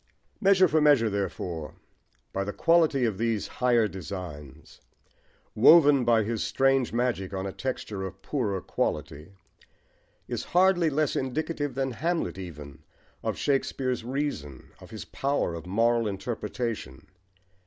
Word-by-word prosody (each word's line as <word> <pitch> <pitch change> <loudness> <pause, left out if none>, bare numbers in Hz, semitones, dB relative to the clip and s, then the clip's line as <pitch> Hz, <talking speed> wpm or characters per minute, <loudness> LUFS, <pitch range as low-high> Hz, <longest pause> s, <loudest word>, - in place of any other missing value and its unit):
Measure 195 -2 +5
for 155 -1 +2
Measure, 140 -7 +4
therefore, 90 -5 -4 0.6
by 95 - -1
the 100 - -3
quality 160 -3 +3
of 105 -4 -2
these 115 -3 0
higher 120 -3 +2
designs, 85 -7 -9 0.7
woven 140 +2 +6
by 115 -2 +3
his 110 +1 -2
strange 135 -2 +2
magic 115 -6 -1
on 95 0 -3
a 95 - -3
texture 110 -6 -4
of 95 - -7
poorer 105 -10 -2
quality, 75 +2 -3 1.0
is - - -3
hardly 180 -3 +4
less 150 0 0
indicative 145 +1 -2
than 135 -1 -1
Hamlet 165 - -2
even, 75 -6 -9 0.4
of - - -2
Shakespeare's 135 -3 -1
reason, 120 - -4
of - - -13
his - - -8
power 140 -10 -1
of 85 +1 -7
moral 115 +3 +2
interpretation. 105 - -4
115 Hz, 130 wpm, -27 LUFS, 95-140 Hz, 1.0 s, woven